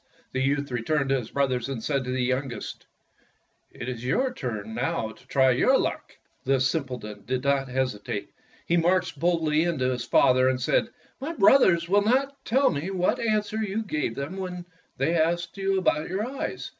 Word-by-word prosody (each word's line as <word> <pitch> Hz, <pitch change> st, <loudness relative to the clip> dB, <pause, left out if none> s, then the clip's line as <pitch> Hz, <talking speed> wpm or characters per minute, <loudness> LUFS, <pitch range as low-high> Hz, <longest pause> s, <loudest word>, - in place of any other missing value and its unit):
The 130 Hz, -, -1 dB
youth 140 Hz, +1 st, 0 dB
returned 135 Hz, +4 st, 0 dB
to 135 Hz, -1 st, +2 dB
his 115 Hz, -, -8 dB
brothers 130 Hz, -3 st, 0 dB
and 125 Hz, -5 st, -4 dB
said 140 Hz, -3 st, 0 dB
to -, -, -5 dB
the 130 Hz, 0 st, 0 dB
youngest, 130 Hz, -2 st, -3 dB, 0.8 s
"It 120 Hz, -, -8 dB
is 125 Hz, -2 st, -5 dB
your 250 Hz, -, +1 dB
turn 110 Hz, -, -5 dB
now 115 Hz, -2 st, -1 dB
to 125 Hz, -, -18 dB
try 130 Hz, -1 st, +4 dB
your 255 Hz, -, +4 dB
luck." -, -, -3 dB, 0.3 s
The 135 Hz, 0 st, +2 dB
simpleton 125 Hz, -5 st, -2 dB
did 130 Hz, 0 st, -1 dB
not 140 Hz, -1 st, +1 dB
hesitate. 125 Hz, -6 st, -3 dB, 0.3 s
He 170 Hz, -, +2 dB
marched 170 Hz, -3 st, +1 dB
boldly 160 Hz, -2 st, +2 dB
in 170 Hz, -1 st, 0 dB
to 130 Hz, 0 st, +1 dB
his 125 Hz, -1 st, -3 dB
father 130 Hz, 0 st, +4 dB
and 130 Hz, -1 st, 0 dB
said: 130 Hz, -, +1 dB, 0.2 s
" -, -, -34 dB
My 305 Hz, +5 st, -3 dB
brothers 195 Hz, -, +5 dB
will 200 Hz, +3 st, +4 dB
not 270 Hz, +6 st, 0 dB
tell 265 Hz, +5 st, +3 dB
me 155 Hz, +3 st, -3 dB
what 185 Hz, -2 st, 0 dB
answer 215 Hz, -1 st, 0 dB
you 220 Hz, 0 st, -2 dB
gave 150 Hz, -, -2 dB
them 145 Hz, +7 st, -5 dB
when 180 Hz, -2 st, -5 dB, 0.3 s
they 135 Hz, +6 st, +1 dB
asked 170 Hz, +1 st, 0 dB
you 195 Hz, 0 st, +1 dB
about 160 Hz, -4 st, +1 dB
your 195 Hz, +4 st, -1 dB
eyes. 265 Hz, +2 st, -5 dB
145 Hz, 190 wpm, -26 LUFS, 130-185 Hz, 0.8 s, brothers